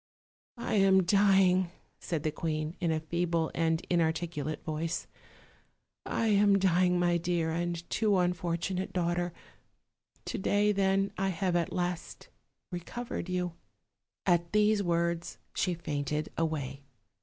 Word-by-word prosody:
"I 235 Hz, -, -3 dB
am 190 Hz, -1 st, +5 dB
dying," 190 Hz, -1 st, +4 dB, 0.3 s
said 160 Hz, -4 st, -3 dB
the 155 Hz, -, 0 dB
queen, 155 Hz, +1 st, -3 dB
in 170 Hz, -3 st, +1 dB
a 160 Hz, -, +1 dB
feeble 170 Hz, 0 st, -1 dB
and 165 Hz, 0 st, +1 dB
inartic 165 Hz, -1 st, +1 dB
ulate 155 Hz, -1 st, -4 dB
voice; 160 Hz, +2 st, -2 dB, 1.0 s
"I 230 Hz, -, 0 dB
am 200 Hz, -1 st, +5 dB
dying, 180 Hz, -1 st, +3 dB
my 175 Hz, -1 st, +3 dB
dear 170 Hz, -1 st, 0 dB
and 170 Hz, 0 st, -2 dB
too 210 Hz, -3 st, +2 dB
unfortunate 180 Hz, +1 st, -1 dB
daughter; 175 Hz, 0 st, 0 dB, 0.9 s
to -, -, -3 dB
day, 205 Hz, +2 st, +2 dB
then, 195 Hz, 0 st, +2 dB
I 195 Hz, 0 st, +1 dB
have 180 Hz, 0 st, -1 dB
at 170 Hz, -2 st, +1 dB
last 175 Hz, -1 st, -3 dB, 0.4 s
recovered 185 Hz, +2 st, -5 dB
you." 180 Hz, -1 st, -1 dB, 0.7 s
At 175 Hz, -1 st, +2 dB
these 210 Hz, 0 st, +4 dB
words 170 Hz, -1 st, -1 dB, 0.2 s
she 180 Hz, -2 st, 0 dB
fainted 150 Hz, -2 st, -2 dB
away. 145 Hz, -4 st, -2 dB
175 Hz, 130 wpm, -30 LUFS, 165-190 Hz, 1.0 s, am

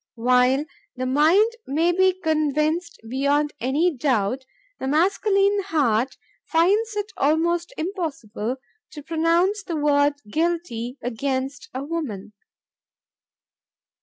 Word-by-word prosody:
While 250 Hz, +4 st, +3 dB, 0.3 s
the 255 Hz, 0 st, -3 dB
mind 320 Hz, -, +4 dB, 0.2 s
may 320 Hz, +5 st, +2 dB
be 375 Hz, +1 st, +2 dB
convinced 310 Hz, +2 st, 0 dB
beyond 280 Hz, +4 st, +1 dB
any 295 Hz, +7 st, +1 dB
doubt, 255 Hz, -2 st, 0 dB, 0.3 s
the 265 Hz, -, -3 dB
masculine 395 Hz, +6 st, +2 dB
heart 260 Hz, -, +1 dB, 0.3 s
finds 410 Hz, +7 st, +2 dB
it 415 Hz, +1 st, -3 dB
almost 335 Hz, +4 st, +1 dB
impossible 295 Hz, -, -3 dB, 0.4 s
to 295 Hz, -, -9 dB
pronounce 335 Hz, +6 st, +1 dB
the 340 Hz, -, -5 dB
word 290 Hz, -1 st, +3 dB
'guilty' 295 Hz, -4 st, -2 dB
against 265 Hz, +3 st, -3 dB
a 260 Hz, -, -3 dB
woman." 280 Hz, -, -5 dB
300 Hz, 105 wpm, -23 LUFS, 260-345 Hz, 0.4 s, mind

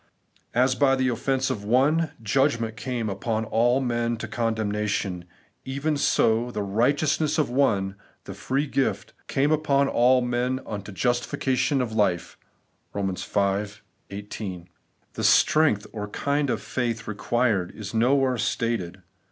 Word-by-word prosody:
As 130 Hz, +2 st, +4 dB
by 135 Hz, 0 st, +3 dB
the 130 Hz, -1 st, +1 dB
offence 130 Hz, +2 st, 0 dB
of 105 Hz, -5 st, -4 dB
one, 140 Hz, +9 st, +2 dB
judgment 115 Hz, -1 st, +1 dB
came 120 Hz, -1 st, -3 dB
upon 110 Hz, +3 st, -2 dB
all 120 Hz, +4 st, +2 dB
men 120 Hz, -2 st, -1 dB
to 110 Hz, -, -5 dB
condemnation; 105 Hz, -5 st, -2 dB, 0.4 s
even 140 Hz, +3 st, -2 dB
so 115 Hz, -4 st, +2 dB
by 125 Hz, -, -7 dB
the 105 Hz, -, -2 dB
RIGHTEOUSNESS 145 Hz, +9 st, +1 dB
OF 150 Hz, -6 st, +1 dB
ONE, 100 Hz, -8 st, +1 dB, 0.3 s
the -, -, -8 dB
free 135 Hz, +3 st, -1 dB
gift 110 Hz, -8 st, -1 dB
came 140 Hz, +2 st, +1 dB
upon 140 Hz, -3 st, +2 dB
all 125 Hz, 0 st, +4 dB
men 125 Hz, +1 st, -1 dB
unto 105 Hz, -1 st, -6 dB
justification 125 Hz, +5 st, 0 dB
of 120 Hz, -, -5 dB
life' 100 Hz, -6 st, 0 dB, 0.6 s
(Eom. 95 Hz, -2 st, -1 dB, 0.6 s
v. 110 Hz, -, -22 dB, 0.3 s
18). 100 Hz, -3 st, -7 dB, 0.4 s
The -, -, -5 dB
strength 150 Hz, -10 st, +4 dB
or 105 Hz, -2 st, -4 dB
kind 140 Hz, +6 st, -1 dB
of -, -, -2 dB
faith 115 Hz, -4 st, -3 dB
required 110 Hz, -3 st, 0 dB
is 105 Hz, 0 st, -7 dB
nowhere 130 Hz, +2 st, +2 dB
stated. 95 Hz, -6 st, -2 dB
120 Hz, 135 wpm, -25 LUFS, 105-135 Hz, 0.6 s, As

